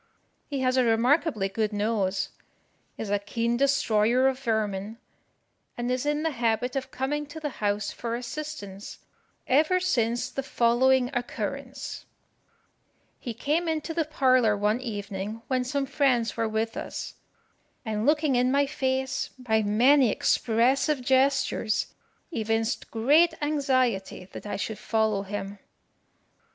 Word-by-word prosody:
He 280 -3 -3
has 255 0 +2
a 255 - +5
remarkably 235 - +2
good 215 +2 -1
nose, 205 -2 0 0.7
is 210 -2 -4
a 205 - +2
keen 230 +3 -1
destroyer 250 -2 +3
of 265 -1 0
vermin, 220 -3 -2 0.8
and 240 +1 -2
is 255 +3 -1
in 295 +1 0
the 320 - +1
habit 240 0 0
of 265 -1 -3
coming 295 +3 -2
to 295 +2 -8
the 300 -1 -3
house 205 0 0
for 235 -1 -4
assistance 240 -6 -7 0.5
ever 310 +7 +3
since 240 -8 0
the 275 - -3
following 255 +1 +2
occurrence: 260 +2 -5 1.1
He 235 -3 -6
came 310 +8 0
into 320 +1 -2
the 325 0 +1
parlour 255 -8 +3
one 210 +3 +1
evening 205 -1 -5
when 255 -1 +1
some 275 +2 -1
friends 255 -5 +1
were 225 -1 0
with 220 +1 -2
us, - - -5 0.7
and 215 -1 -2
looking 300 0 +2
in 250 +1 +3
my 280 +1 +3
face, 265 -2 -1
by 220 -4 +1
many 245 +5 +4
expressive 255 +7 +2
gestures, 260 -4 +1 0.4
evinced 225 -4 -1
great 290 +10 +4
anxiety 260 -11 0
that - - -8
I - - -3
should 215 +1 -4
follow 220 -3 +1
him. 200 0 -6
245 Hz, 135 wpm, -27 LUFS, 220-275 Hz, 1.1 s, a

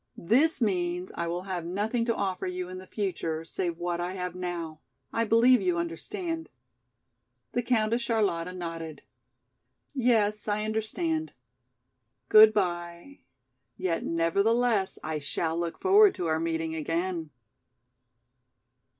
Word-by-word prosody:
This 255 - +3
means 180 -3 -1
I 170 - -3
will 175 +2 -3
have 185 -3 -4
nothing 210 +7 -1
to 230 -1 0
offer 190 -3 -2
you 180 0 -4
in 185 0 -7
the 185 - -12
future, 165 -6 -3
save 170 0 -3
what 175 0 -2
I 180 +1 -3
have 180 -2 -4
now, 175 -3 -5 0.3
I 230 - +1
believe 235 +2 +5
you 180 -2 +1
understand." 325 - -4 1.0
The 245 - 0
Countess 235 -1 +1
Charlotta 205 -7 0
nodded. 165 -4 -6 0.9
"Yes, 220 -6 +2
I 210 0 0
understand. 315 +10 -2 1.0
Goodby, 185 +1 +4 0.6
yet 180 -3 -1
nevertheless 200 +6 +1
I 155 -1 -2
shall 155 +4 -2
look 170 0 -3
forward 400 +1 +6
to 175 - -3
our 160 -1 +1
meeting 160 -1 -2
again." 165 +1 -2
185 Hz, 125 wpm, -28 LUFS, 170-225 Hz, 1.0 s, forward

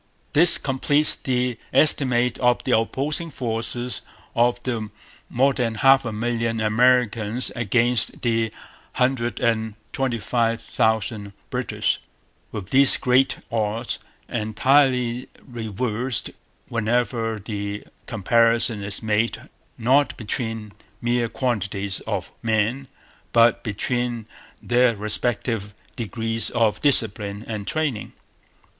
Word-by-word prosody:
This 170 +3 +9
completes 145 +2 +2
the 125 -2 -2
estimate 125 -5 +4
of 125 -1 +2
the 130 - +2
opposing 140 +8 -1
forces 120 -1 -3 0.3
of 120 +1 +2
the 115 -4 -3 0.4
more 135 +3 +2
than 120 -3 -2
half 135 +3 +4
a 115 - -3
million 115 +1 -2
Americans 115 0 +2
against 120 0 +1
the 115 -2 0 0.4
hundred 125 -4 0
and 110 -2 0 0.2
twenty 130 -3 -1
five 115 +1 0
thousand 110 -2 -1 0.2
British; - - -1 0.5
with 100 -3 -7
these 135 +1 +6
great 130 +1 +2
odds 115 +1 -2 0.3
entirely 125 +2 +1 0.2
reversed 120 +1 -2 0.4
whenever 115 0 -1
the 100 -1 -5 0.2
comparison 115 +1 +2
is 100 +2 -1
made 110 +1 -1 0.3
not 130 +4 +2
between 110 -1 -4 0.3
mere 120 -1 0
quantities 100 -6 -2
of - - -3
men 115 +4 0 0.5
but 115 0 +4
between 120 +1 -2 0.4
their 120 -1 +3
respective 110 0 -1 0.2
degrees 115 -1 -2
of 110 -3 0
discipline 105 -6 +2
and 105 -3 -5
training. 145 -9 -2
115 Hz, 105 wpm, -22 LUFS, 110-125 Hz, 0.5 s, This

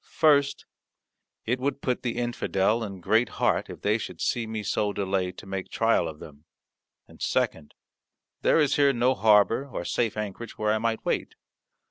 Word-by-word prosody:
First, 145 -3 +3 0.8
it 125 +3 0
would 140 +2 -1
put 125 -1 -1
the 120 -2 -3
infidel 115 -2 0
in 100 -4 -7
great 110 +6 +2
heart - - +1
if - - -10
they 105 +2 +2
should - - -7
see 115 -2 -1
me 110 -1 -4
so 105 0 0
delay 95 -2 -1
to 95 - -12
make 95 -1 -5
trial 115 -6 +2
of 80 -1 -7
them; 75 0 -13 0.6
and, - - -18
second, 75 - -1 0.7
there - - +4
is 150 -3 +2
here 140 -1 +4
no 125 +1 +2
harbour 110 +4 +4
or 105 -10 -5
safe 115 +1 -1
anchorage 105 +2 -6
where 105 0 +1
I 110 - 0
might 115 0 -2
wait. - - -1
110 Hz, 175 wpm, -26 LUFS, 100-125 Hz, 0.8 s, there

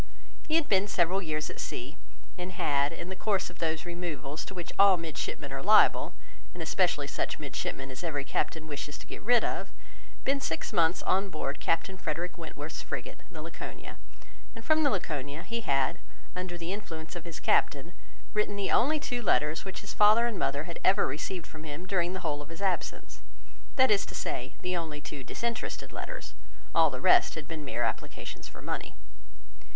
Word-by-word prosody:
He 315 - +2
had 330 -2 +4
been 195 0 +4
several 190 -1 +2
years 155 -3 -2
at - - -10
sea, 130 +6 -4 0.4
and 180 +1 -5
had, 140 -4 +2
in 170 +1 -6
the 190 - -4
course 195 -2 0
of 175 - -17
those 160 0 0
removals 165 -5 -4
to 190 - -8
which 175 -2 -5
all 195 -2 +8
midshipmen 165 -2 -4
are - - -2
liable, - - +6 0.4
and - - -3
especially - - +2
such - - -2
midshipmen 135 0 -4
as 130 +6 -7
every 145 -5 -1
captain 155 +3 -1
wishes 150 -1 -4
to - - -11
get - - -8
rid 240 +1 +5
of, - - -1 0.5
been 275 +1 +2
six 160 -8 -2
months 165 +1 +3
on 195 +1 +2
board 150 -4 -3
Captain 185 +3 0
Frederick 170 +3 -2
Wentworth's 160 -2 -6
frigate, - - -5
the - - -8
Laconia; - - -8 0.6
and 225 0 -9
from 310 0 +4
the 290 - +5
Laconia 150 - -2
he 230 0 -2
had, 140 0 +1 0.4
under 180 -1 -3
the 170 +2 -3
influence 165 -6 -6
of 175 - -5
his 170 -2 -7
captain, 150 +5 +2 0.4
written 210 -1 +1
the 200 -1 0
only 300 +5 +4
two 245 -4 -2
letters 150 - +2
which 190 - -5
his 205 - -6
father 215 +3 +7
and 230 -6 -1
mother 140 +2 +1
had 170 0 -6
ever 195 +2 +5
received 175 +3 -3
from 155 0 -10
him 155 +3 -6
during 180 -2 +1
the 185 - -4
whole 145 -3 -1
of 145 - -10
his 165 - -9
absence; 195 -3 -2 0.5
that 260 -3 +6
is 205 -1 +4
to - - -7
say, 125 +3 -3
the 180 0 0
only 160 -3 -3
two 145 -2 -7
disinterested 235 - -3
letters; - - -6 0.4
all - - +6
the - - -5
rest 365 -1 +6
had 155 -2 -6
been 160 -2 -5
mere 120 -4 -1
applications - - -3
for - - -11
money. - - -3
175 Hz, 190 wpm, -30 LUFS, 155-200 Hz, 0.6 s, all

